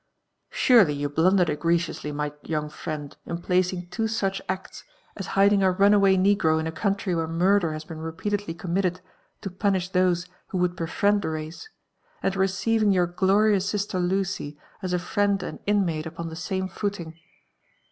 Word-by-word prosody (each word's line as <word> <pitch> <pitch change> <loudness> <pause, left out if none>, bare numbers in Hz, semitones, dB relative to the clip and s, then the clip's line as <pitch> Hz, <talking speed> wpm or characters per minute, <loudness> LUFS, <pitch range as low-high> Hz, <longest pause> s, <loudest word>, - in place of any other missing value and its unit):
"Surely 225 - +5
you 145 0 -2
blundered 170 +3 +3
egregiously, 165 -1 -1
my 150 0 -3
young 150 -1 -3
friend, 150 -4 -6
in 170 - -3
placing 180 0 0
two 225 +4 -1
such 195 -3 -1
acts, 190 0 -5 0.3
as 195 - -6
hiding 200 0 +5
a 190 - +4
runaway 195 +1 +4
negro 185 -5 +3
In 160 - -2
a 160 - -2
country 200 +2 -1
where 165 -1 -1
murder 175 +1 +2
has 155 0 -6
been 160 0 -9
repeatedly 165 +3 -3
committed 180 +1 -1 0.4
to 195 - -5
[>unish 190 -1 0
those 180 -1 +2 0.2
who 190 - -4
would 180 0 +1
befriend 200 +5 +1
ihe - - -1
race, 155 - -7 0.5
and 195 - 0
receiving 200 +3 +2
your 180 -2 +3
glorious 195 +3 +2
sister 205 -2 -2
Lucy 180 -4 -1 0.2
as 185 -2 -3
a 180 - +2
friend 200 +1 0
and - - -6
inmate 175 -6 +1
upon 165 +1 -6
the 160 - -8
same 190 +2 -3
fooling. 175 -4 -5
185 Hz, 165 wpm, -25 LUFS, 165-200 Hz, 0.5 s, Surely